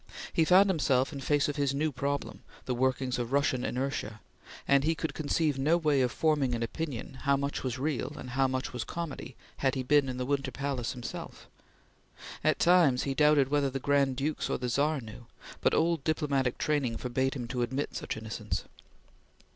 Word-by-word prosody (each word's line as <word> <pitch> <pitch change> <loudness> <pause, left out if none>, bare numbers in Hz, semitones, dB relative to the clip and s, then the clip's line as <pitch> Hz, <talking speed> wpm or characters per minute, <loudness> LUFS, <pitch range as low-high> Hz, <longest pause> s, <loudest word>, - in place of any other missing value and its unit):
He 165 - +3
found 185 +4 +6
himself 140 -6 +2
in 140 - -5
face 145 +2 +1
of 145 0 -3
his 140 -1 +1
new 155 +2 0
problem 140 +2 -3 0.2
the 130 - -1
workings 130 0 0
of 120 0 -3
Russian 140 -3 +1
inertia 125 -5 -3 0.5
and 140 0 +4
he 160 +2 +2
could 160 +1 -3
conceive 150 -2 0
no 155 +5 +3
way 150 -5 +2
of 125 -2 +1
forming 145 -5 +1
an 115 - -2
opinion 130 0 -5
how 140 +1 +3
much 140 +1 -2
was 130 -2 -2
real 145 +1 -2
and 125 - -7
how 135 +1 +2
much 130 0 -3
was 125 -3 -3
comedy 170 +3 -6 0.2
had 135 -1 +1
he 130 - -2
been 140 +1 +3
in 125 - -4
the 125 - -2
Winter 135 0 0
Palace 135 -2 -3
himself. 125 -2 -8 1.0
At - - +3
times 170 -8 +4
he 135 - -1
doubted 150 -2 +4
whether 145 -1 +2
the 135 +1 -3
Grand 140 -1 +2
Dukes 145 +4 -2
or - - 0
the 125 0 -3
Czar 145 +3 +1
knew, 115 +1 -11 0.3
but - - +3
old 165 -3 +1
diplomatic 140 -5 0
training 140 -6 0
forbade 130 +2 -1
him 120 -3 -4
to 125 -1 -2
admit 130 +4 -2
such - - -4
innocence. 110 -1 -4
135 Hz, 195 wpm, -30 LUFS, 125-150 Hz, 1.0 s, found